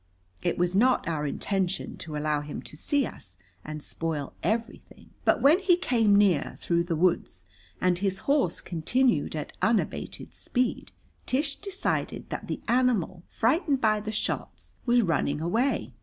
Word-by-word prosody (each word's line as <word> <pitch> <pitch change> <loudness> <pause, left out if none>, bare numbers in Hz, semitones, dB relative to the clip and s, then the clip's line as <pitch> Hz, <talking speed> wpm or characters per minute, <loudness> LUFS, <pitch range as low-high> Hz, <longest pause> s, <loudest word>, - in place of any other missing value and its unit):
It - - 0
was 175 0 +1
not 245 +1 +3
our 150 -3 -1
intention 190 +4 -2
to 155 -3 -6
allow 150 0 0
him 145 0 -7
to - - -9
see 280 - +1
us 95 - -9 0.3
and 150 -1 -7
spoil 155 -4 -4
everything. 225 +7 -3
But - - +3
when 300 +6 +6
he 365 -3 +4
came 225 - +3
near, 195 -8 +3
through 170 0 0
the 170 -1 -1
woods, 160 - 0 0.3
and 180 -1 +2
his 190 -1 -1
horse 275 - +1
continued 175 - +1
at 150 - -5
unabated 225 -1 -1
speed, 250 -1 -2 0.4
Tish 280 +2 +1
decided 395 -1 -3
that - - -4
the - - -4
animal, 230 -8 +1
frightened 275 - +1
by 215 -2 +3
the 215 +1 -4
shots, 215 - -3
was 240 0 +5
running 150 -4 0
away. 190 - 0
195 Hz, 155 wpm, -27 LUFS, 160-250 Hz, 0.4 s, when